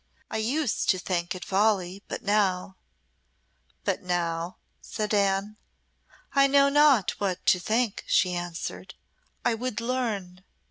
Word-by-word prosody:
"I - - -1
used 245 +4 0
to 185 - +4
think 180 -1 -2
it 185 - -7
folly, 195 -2 +1
but - - -5
now 195 -2 +1 0.5
" 65 0 -42
"But - - 0
now 170 -1 -2
" - - -45
said 215 0 -3
Anne. 200 +1 +1 0.8
"I 275 0 +5
know 280 0 +5
not 280 -8 +5
what 190 -3 -2
to 180 - +4
think," 220 +3 0
she 180 -1 +3
answered. 175 -1 -5 0.5
"I 240 - +3
would 230 -1 -3
learn." 220 -7 -3
200 Hz, 140 wpm, -27 LUFS, 180-230 Hz, 0.8 s, I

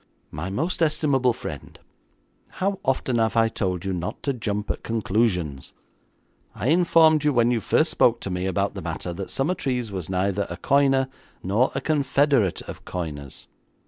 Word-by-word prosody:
'My 75 +6 -5
most 160 - -2
estimable 150 -5 +2
friend, - - -8 0.8
how 195 +1 -1
often 130 -2 0
have 110 0 +1
I 115 0 +4
told 95 -4 -2
you 95 - -1
not 90 -1 -4
to 140 - 0
jump 105 -3 -2
at - - -6
conclusions? 105 - -1 0.8
I 130 - -1
informed 160 -2 +5
you 150 - +3
when 120 -2 +3
you 120 - +1
first 155 - +2
spoke 120 -1 +3
to 100 - -4
me 90 +1 -2
about 95 - 0
the - - -6
matter 90 - -4
that 95 +2 -6
Summertrees 135 - -1
was 95 -4 -5
neither 95 +2 0
a - - -6
coiner 135 -1 +3 0.4
nor 105 +8 +2
a - - -1
confederate 140 - +2
of - - -9
coiners. 75 -6 -6
115 Hz, 165 wpm, -24 LUFS, 95-140 Hz, 0.8 s, informed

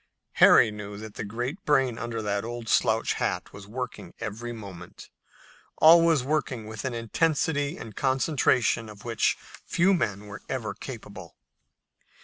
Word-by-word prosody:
Harry 110 - +8
knew 105 -1 -7
that 110 0 -9
the - - -5
great 120 - -4
brain 135 -5 +2
under 115 -1 -4
the 100 -1 -1
old 120 0 -6
slouch - - +2
hat - - -2
was 100 -1 -11
working 125 +3 -6
every 115 +3 -5
moment, 100 -6 -10 0.7
always 165 -3 +6
working 135 -5 -1
with 110 +1 -7
an 130 - -2
intensity 145 +5 0
and 110 -3 -9
concentration 130 -4 +1
of 105 0 -13
which 115 -2 +1 0.3
few 190 +3 +2
men 105 - -1
were 100 0 -9
ever 115 -6 -3
capable. 100 - -9
115 Hz, 140 wpm, -27 LUFS, 105-135 Hz, 0.7 s, Harry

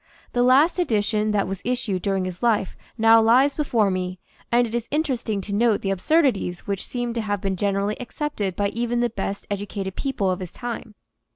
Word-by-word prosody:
The 245 - +2
last 275 +9 +4
edition 215 -7 +1
that 205 -2 +1
was 190 0 -5
issued 240 -7 -1
during 195 -1 0
his 185 -1 -6
life 220 -5 +1 0.2
now 225 0 +6
lies 255 +6 +5
before 230 -9 +1
me, 185 0 -3 0.3
and 240 +1 +4
it 225 - -7
is 235 -1 -2
interesting 255 -9 -1
to 200 +1 -6
note 220 0 +2
the 195 - -1
absurdities 205 - +1
which 200 -2 -3
seem 245 -1 -3
to 230 - -1
have 205 -2 -2
been 195 0 -1
generally 200 +3 -1
accepted 240 - -3
by 205 -1 0
even 240 +2 -1
the 240 -2 +1
best 200 -1 -4
educated 200 -1 -4
people 225 -9 -1
of 180 - -2
his 180 -2 -7
time. 235 -3 -6
215 Hz, 195 wpm, -23 LUFS, 195-240 Hz, 0.3 s, now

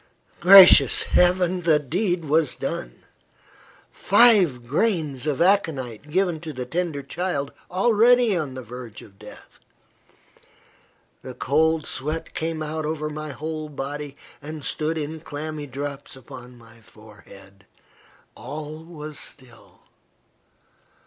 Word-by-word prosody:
Gracious 190 +1 +8
Heaven! 180 0 +2
the 165 -3 +3
deed 175 - -2
was 155 -1 +1
done. - - -6 0.9
Five 195 - +4
grains 155 - -1
of 150 +2 +1
aconite 150 - 0
given 175 0 0
to 160 0 -7
the 125 -1 -5
tender 165 0 -3
child, 145 -1 -3 0.2
already 230 +3 +3
on 150 -6 -3
the 130 - -7
verge 120 -2 -10
of 100 -1 -18
death! - - -14 1.6
The 130 -1 -9
cold 155 +7 +1
sweat 155 +4 -5
came 160 -1 -3
out 155 +1 -4
over 155 0 -3
my 155 0 -6
whole 155 +2 -6
body, 145 0 -6 0.2
and 150 0 -8
stood 160 +1 -2
in 155 +1 -5
clammy 150 -1 -7
drops 140 +1 -7
upon 125 -1 -13
my 115 -1 -18
forehead. 105 -3 -17 0.7
All 150 +3 -8
was 155 -3 -9
still. 125 -4 -11
150 Hz, 115 wpm, -23 LUFS, 130-170 Hz, 1.6 s, Gracious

